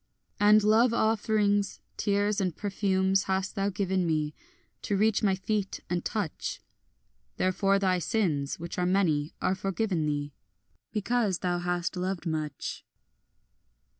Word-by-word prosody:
And 210 +1 +6
love 225 +3 +4
offerings, 210 -2 +1 0.2
tears 205 0 +1
and 185 -4 -1
perfumes, 190 -2 +1
hast 190 +1 -1
thou 200 -1 0
given 190 -1 0
me, 155 -2 0 0.5
To 200 - -1
reach 215 +1 +3
my 195 -3 +3
feet 200 +1 -2
and 175 -1 0
touch; 205 -8 -3 0.8
Therefore 195 +2 +2
thy 185 -2 +2
sins, 155 -8 0
which 170 +2 -5
are 180 - +1
many, 165 -6 +1
are - - +2
forgiven 190 -3 -1
thee, 145 -1 -2 0.6
Because 210 -2 0
thou 175 -1 +1
hast 175 0 -2
loved 185 0 -3
much. 155 -4 -3
190 Hz, 130 wpm, -28 LUFS, 175-205 Hz, 0.8 s, And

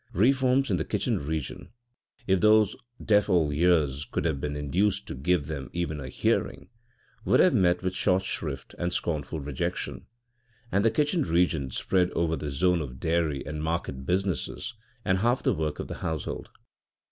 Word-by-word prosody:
Reforms 130 +4 +3
in 90 - +2
the - - -1
kitchen - - -1
region, 75 -3 -4 0.6
if 95 -1 +3
those 110 0 +5 0.3
deaf 105 -1 +3
old 80 -6 +3
ears 75 -4 +2
could - - -1
have 75 -4 0
been 75 0 -2
induced 90 +8 0
to - - -6
give 75 +3 +1
them 70 -4 -5
even 85 -3 -2
a 65 -2 -6
hearing, - - -1 0.5
would - - +3
have - - +5
met 90 -1 +3
with 95 0 -1
short 95 0 +1
shrift 70 -8 -4
and 85 0 -1
scornful 80 -2 -2
rejection, 70 -2 -4 0.6
and 100 +1 +2
the 115 - +5
kitchen 150 +8 +1
region 85 - +1
spread 90 +7 +1
over 80 -1 +1
the 75 -2 -4
zone 90 +4 +2
of 65 -3 -7
dairy 80 -3 0
and 75 +1 -4
market 80 -5 -2
business 95 - -1 0.3
and 95 -1 +2
half 120 +5 +1
the - - +3
work 75 -1 -2
of - - -5
the - - -6
household. 80 -3 -4
85 Hz, 170 wpm, -27 LUFS, 75-95 Hz, 0.6 s, those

